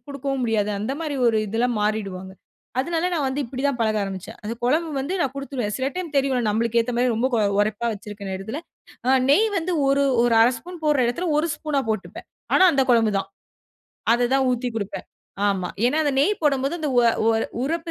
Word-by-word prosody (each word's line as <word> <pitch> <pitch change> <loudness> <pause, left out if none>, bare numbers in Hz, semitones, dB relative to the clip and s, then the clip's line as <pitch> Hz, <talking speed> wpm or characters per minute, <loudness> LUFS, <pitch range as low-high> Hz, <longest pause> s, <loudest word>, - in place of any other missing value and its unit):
குடுக்கவும் 275 -1 -3
முடியாது. 220 -3 +1
அந்த 220 +5 -2
மாரி 310 -3 -3
ஒரு 225 -2 +3
இதுலா 230 +4 0
மாறிடுவாங்க. 195 -3 -2 0.5
அதனால 335 +4 -1
நான் 300 -4 0
வந்து 265 +2 -2
இப்டி 260 +2 -6
தான் 280 -3 -1
பழக 220 -1 +1
ஆரம்பிச்சேன். 190 -2 -6
அது 215 - -3
குழம்பு 315 +6 +1
வந்து 280 +8 -3
நான் 270 -6 0
குடுத்துருவேன். 275 -6 -4
சில 260 0 -1
டைம் 360 -4 -5
தெரியும் 265 -4 +1
நம்மளுக்கேத்த 230 +2 +1
மாரி 250 +1 +2
ரொம்ப 240 +4 +1
கொ - - +2 0.2
உரப்பா 215 +2 0
வச்சுருகுற 205 0 -9
நேரத்துல 205 +10 -5 0.5
அ - - +5 0.2
நெய் 425 +10 +5
வந்து 345 +2 -2 0.2
ஒரு, 280 +1 +3 0.2
ஒரு 240 -1 +3
1/2 230 - +6
ஸ்பூன் 350 +8 -10
போடுற 300 -3 +3
இடத்துல 340 +10 -1
1 320 +3 +1
ஸ்பூனா 300 -2 -1
போட்டுப்பேன். 220 0 -4 0.3
ஆனா, 375 - +6
அந்த 275 - +3
குழம்பு 225 -3 +4
தான். - - -4 0.8
அத 240 0 +2
தான் 270 -1 +3
ஊத்தி 245 0 -1
கொடுப்பேன். 200 -3 -4 0.4
ஆமா. 190 -3 -1 0.2
ஏன்னா 290 +5 +1
அந்த 290 - +1
நெய் 365 +9 +3
போடும்போது 275 0 +1
அந்த 305 - -1
உவ 245 - +6 0.2
உவ 225 - +4 0.3
உரப்பு 330 +4 -2
250 Hz, 195 wpm, -23 LUFS, 220-285 Hz, 0.8 s, 1/2